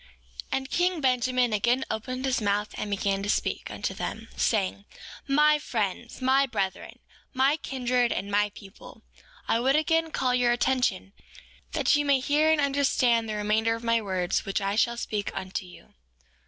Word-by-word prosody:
4:4 - - -23 0.5
And 265 0 -2
king 355 -1 +1
Benjamin 250 -3 +1
again 240 +5 +1
opened 255 +4 -4
his 260 -2 0
mouth 205 0 0
and 210 - -4
began 200 -1 -1
to 205 - -4
speak - - -1
unto - - -4
them, - - -6
saying: 200 -2 0 0.4
My 300 +2 +4
friends 225 -3 -3
and - - -15
my 270 +1 +4
brethren, 190 -6 -3 0.4
my 270 +3 +3
kindred 250 -4 0
and 200 +2 -3
my 205 +1 +2
people, 195 0 -13 0.4
I 225 - +2
would 265 +3 +2
again 325 +1 +2
call 255 -5 0
your 245 -1 +3
attention, 245 -6 0 0.6
that - - +3
ye 290 - +2
may 280 -2 +3
hear 295 +4 +2
and 315 - +3
understand 265 -5 +2
the 215 - -2
remainder 215 +2 +1
of 230 - -9
my 230 0 +2
words 185 -3 -1
which 195 - -2
I 200 0 -1
shall 235 +2 +1
speak 210 -3 -3
unto 190 0 -4
you. 180 - -16
240 Hz, 175 wpm, -27 LUFS, 205-265 Hz, 0.6 s, My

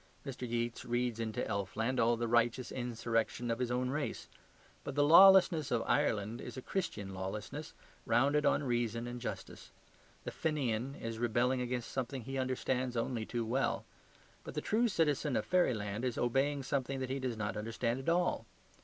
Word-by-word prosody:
Mr. 125 -3 -5
Yeats 120 0 -2
reads 120 -1 -1
into 110 -2 -2
elfland 110 +6 -1
all 115 +1 +3
the 120 0 -1
righteous 120 +1 +1
insurrection 120 -1 -1
of 115 - -2
his 125 -1 0
own 125 +1 0
race. 145 +1 -3 0.6
But - - -5
the 145 - +4
lawlessness 170 -1 +7
of 120 -2 +1
Ireland 115 -5 0
is 125 +1 -8
a - - -4
Christian 105 - -3
lawlessness, 95 +2 -5 0.3
founded 140 +6 +3
on 145 - +3
reason 120 -2 -1
and 120 0 -6
justice. 100 -5 -6 0.5
The - - -4
Fenian 135 -5 -1
is 115 -3 -5
rebelling 120 +2 +1
against 125 -1 -3
something 130 -1 -3
he 135 +3 -4
understands 130 -1 -1
only 115 -1 -2
too 120 -1 -2
well; 130 +5 0 0.6
but - - -8
the - - 0
true 230 +3 +2
citizen 150 - +1
of - - 0
fairyland 110 - +1
is 125 -2 -1
obeying 135 +3 +1
something 135 0 -2
that 130 0 -3
he 135 - -1
does 125 -3 -3
not 105 -1 -2
understand 115 +3 -2
at 135 - -2
all. 170 -9 +1
125 Hz, 170 wpm, -33 LUFS, 115-135 Hz, 0.6 s, lawlessness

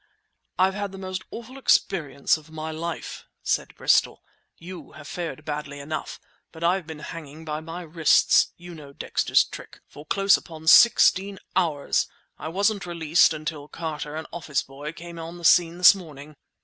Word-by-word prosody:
"I've 190 +1 +3
had 205 -1 -4
the 195 - -9
most 185 -1 -5
awful 240 +4 -9
experience 145 - +2
of 155 0 -12
my 160 0 -6
life," 165 +1 -5 0.2
said - - -1
Bristol. - - +2 0.3
"You've 170 -4 -11
fared 165 -3 -6
badly 145 -1 -5
enough, 155 +2 -5 0.3
but 165 0 -10
I've 175 0 +1
been 160 -1 -7
hanging 155 0 -9
by 150 -1 -3
my 165 +3 -7
wrists—you 170 +2 +2
know 145 -4 -12
Dexter's - - +2
trick!—for 145 +1 -12
close 195 +2 +4
upon 160 -2 -12
sixteen 195 0 +6 0.2
hours! 150 -5 +1 0.3
I - - -6
wasn't 200 +3 0
released 170 -1 +3
until 155 -2 -5
Carter, 155 -2 -5
an 160 - -5
office 155 -4 -2
boy, 140 +3 -8
came 170 +1 -10
on 165 +1 -7
the 170 - -8
scene 170 0 +5
this 180 +2 +9
morning!" 155 -6 -11
165 Hz, 155 wpm, -25 LUFS, 155-180 Hz, 0.3 s, this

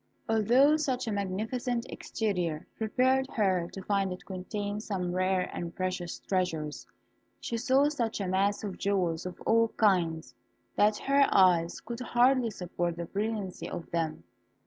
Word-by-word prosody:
Although 245 +7 +4
such 265 -5 -1
a - - 0
magnificent 220 +5 -2
exterior 180 -7 -2
prepared 260 +4 +2
her 185 -5 +1
to 195 - -8
find 195 -2 0
it 180 - -7
contain 205 +2 -4
some 185 -5 -3
rare 185 0 +1
and 170 -1 -5
precious 185 -2 -3
treasures, 165 -6 -2 0.5
she 235 - -4
saw 265 +4 +3
such 240 -8 -2
a 195 - -2
mass 195 +3 +1
of 200 -3 -5
jewels 180 -4 0
of 180 - -8
all 230 0 +3
kinds, 165 - +2 0.4
that 210 0 +4
her 275 0 +3
eyes 175 -3 +4
could 235 0 -6
hardly 250 0 +3
support 175 -3 -3
the 170 - -3
brilliancy 205 0 -3
of 170 - -7
them. 165 -2 -2
200 Hz, 145 wpm, -29 LUFS, 180-230 Hz, 0.5 s, Although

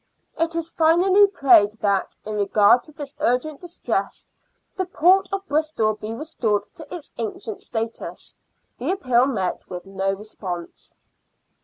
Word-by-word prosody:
It 330 +1 -1
is 335 0 -3
finally 365 +5 +5
prayed 240 - +5
that, 200 -3 -1
in 215 - -4
regard 205 +3 +4
to 310 - -13
this 290 -2 -8
urgent 265 +5 0
distress, 350 -1 -3 0.5
the 375 -1 -1
port 370 +2 +3
of 390 0 -3
Bristol 300 -9 +1
be 215 +1 -7
restored 230 -6 -1
to 315 - -11
its 340 -5 -7
ancient 220 -1 -5
status. 225 0 -5 0.4
The - - -1
appeal 255 -8 +2
met 195 -9 -2
with 180 0 -7
no 195 0 -1
response. 190 -4 -7
250 Hz, 140 wpm, -23 LUFS, 210-330 Hz, 0.5 s, finally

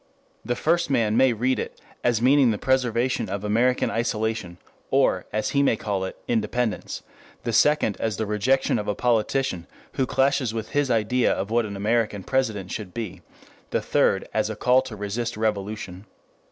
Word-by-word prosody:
The 120 - -1
first 165 +3 +1
man 115 -5 +2
may 130 +1 +5
read 125 +3 0
it - - -6 0.2
as 120 -2 +1
meaning 135 0 +5
the 110 - 0
preservation 125 -3 0
of 100 +1 -4
American 115 +5 +2
isolation, 110 -5 -2 0.3
or - - +2
as 110 0 -1
he 140 - +2
may 140 - +3
call 100 -3 -2
it, - - -7
independence; 115 0 -1 0.4
the 115 - -2
second 150 -7 +3
as 110 -3 -1
the 110 - -1
rejection 110 +4 +1
of 105 - -5
a 105 - 0
politician 115 -5 0 0.3
who 130 - 0
clashes 135 -4 +1
with 110 -1 -4
his 145 -2 0
idea 120 +2 +2
of 100 +3 -2
what 115 -1 +2
an 100 - -6
American 105 -1 0
president 110 -8 -1
should 100 -5 -6
be, 95 -6 -5 0.5
the - - 0
third - - +1
as - - +1
a - - -4
call 125 +1 +4
to 125 -4 -8
resist 105 +3 -3
revolution. 105 -3 -3
115 Hz, 175 wpm, -24 LUFS, 105-125 Hz, 0.5 s, may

